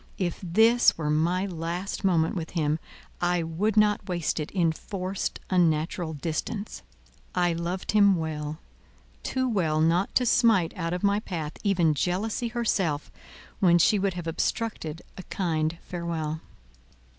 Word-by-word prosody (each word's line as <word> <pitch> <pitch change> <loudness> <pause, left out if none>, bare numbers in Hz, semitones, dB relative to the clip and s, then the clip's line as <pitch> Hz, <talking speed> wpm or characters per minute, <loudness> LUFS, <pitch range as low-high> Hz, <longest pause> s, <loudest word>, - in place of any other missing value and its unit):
If 175 -3 -2
this 220 +7 +4
were 150 -2 -1
my 170 +5 +1
last 175 +2 -4
moment 170 -3 +2
with 165 -3 -4
him, 155 0 +1 0.4
I 175 -1 +1
would 190 +7 -1
not 210 -2 +3
waste 175 -2 -1
it 150 - -3
in 170 -4 +2
forced, 185 +3 -4
unnatural 165 -1 +1
distance. 170 +8 -4 0.5
I 175 -1 +2
loved 170 +3 -3
him 200 -2 +5
well—too 160 - -5
well 170 -9 +1
not 170 +4 +2
to 250 - +4
smite 225 -8 +3
out 165 -1 -2
of 180 - -3
my 200 +1 +3
path 160 -7 -5
even 175 -6 +3
Jealousy 195 - -1
herself, 195 -10 -1 0.5
when 175 -3 +5
she 200 +5 +4
would 190 -2 0
have 175 -2 -5
obstructed 165 -1 -2 0.2
a - - -6
kind 160 -3 -1
farewell. 165 -3 -3
175 Hz, 140 wpm, -27 LUFS, 160-200 Hz, 0.5 s, him